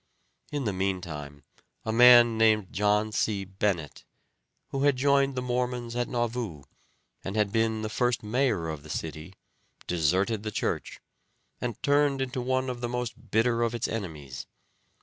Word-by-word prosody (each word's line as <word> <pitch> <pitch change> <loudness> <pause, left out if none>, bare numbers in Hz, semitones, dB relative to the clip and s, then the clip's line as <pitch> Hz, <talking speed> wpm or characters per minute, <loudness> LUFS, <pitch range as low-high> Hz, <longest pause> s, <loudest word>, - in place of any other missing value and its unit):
In 145 -2 -2
the 105 - 0
meantime 85 -7 -4 0.4
a 110 - -1
man 120 0 +8
named 110 -3 +3
John 105 +2 +2
C. 105 -2 0
Bennett, 95 -5 -2 0.7
who 135 - -3
had 145 -1 +4
joined 140 +1 +2
the 125 - -2
Mormons 125 -1 -2
at 120 0 0
Nauvoo, 120 - -3 0.6
and 95 - -5
had 105 -2 +1
been 110 0 +1
the - - -1
first 120 +2 0
mayor 110 -6 0
of 80 -3 -5
the 75 - -14
city, 80 +4 -5 0.5
deserted 95 +6 +1
the 110 - -4
church, 105 - -3 0.6
and 120 -4 -4
turned 145 -1 +3
into 130 -1 -2
one 130 +1 0
of 125 -1 -4
the 120 - -2
most 120 -1 -5
bitter 115 +3 +2
of 115 0 0
its 115 - -1
enemies. 75 -11 -6
110 Hz, 155 wpm, -28 LUFS, 95-125 Hz, 0.7 s, man